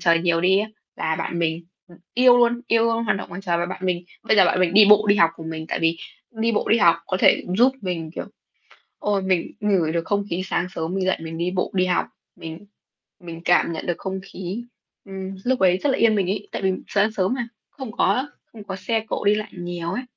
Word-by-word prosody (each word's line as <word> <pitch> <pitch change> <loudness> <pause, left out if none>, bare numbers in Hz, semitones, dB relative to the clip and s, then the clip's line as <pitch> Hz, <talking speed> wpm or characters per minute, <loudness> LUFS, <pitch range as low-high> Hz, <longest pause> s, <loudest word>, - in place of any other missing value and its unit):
trời 170 -1 +4
nhiều 170 -1 +1
đi 190 +2 +4
á, 215 +2 -1 0.3
là 160 0 -1
bạn 170 - -3
mình, 165 0 -1 0.2
ừm, 175 - -17 0.2
yêu 250 0 +6
luôn, 240 0 +3
yêu 230 -1 +3
luôn 230 0 +1
hoạt 210 - +1
động 195 - -7
ngoài 180 +3 -7
trời 170 -3 +1
và 175 - -1
bạn 185 - -7
mình 175 -1 -1 0.2
bây 220 - +2
giờ 195 - +7
bạn 185 - +1
mình 180 0 +2
đi 210 0 +9
bộ 210 0 +6
đi 200 - +5
học 170 -4 +5
cùng 160 0 -7
mình. 160 0 -6
Tại - - -2
vì 165 0 +1 0.3
đi 230 0 -1
bộ 210 - -1
đi 230 - +4
học 170 -4 +5
có 185 - -1
thể - - +4
giúp 255 +3 +5
mình, 170 -4 -4
kiểu, - - -4 0.7
ôi, 205 -2 0
mình 185 -3 0
ngửi 190 -7 +1
được 165 -1 -1
không 205 0 0
khí 180 +2 -1
sáng 180 -2 -1
sớm 165 +2 -3
mình 190 -1 -1
dậy 185 - +1
mình 165 0 -7
đi 175 +1 -1
bộ 180 0 -2
đi 185 -1 +2
học, 180 - +1 0.3
mình 165 +5 -9 0.5
mình 170 -1 -9
cảm 175 -1 +3
nhận 160 - -5
được 175 - -2
không 190 0 -4
khí, 195 +3 -6 0.4
ừm, 195 -1 -7
lúc 255 +1 +1
ấy 185 -1 +4
rất 285 - 0
là 265 - 0
yên 220 -2 +4
bình 190 -3 +1
ấy, 205 +1 -4
tại - - -4
vì 190 -1 +2 0.2
sáng 205 +2 +2
sớm 195 +2 0
mà, 240 -3 -4 0.2
không 260 -6 -8
có 255 +3 +1 0.2
không 215 -2 -11
có 190 -2 -5
xe 220 +4 -1
cộ - - -3
đi 205 +1 +4
lại 215 0 -4
nhiều 175 -2 -5
ấy. 250 - -3
190 Hz, 255 wpm, -22 LUFS, 170-215 Hz, 0.7 s, đi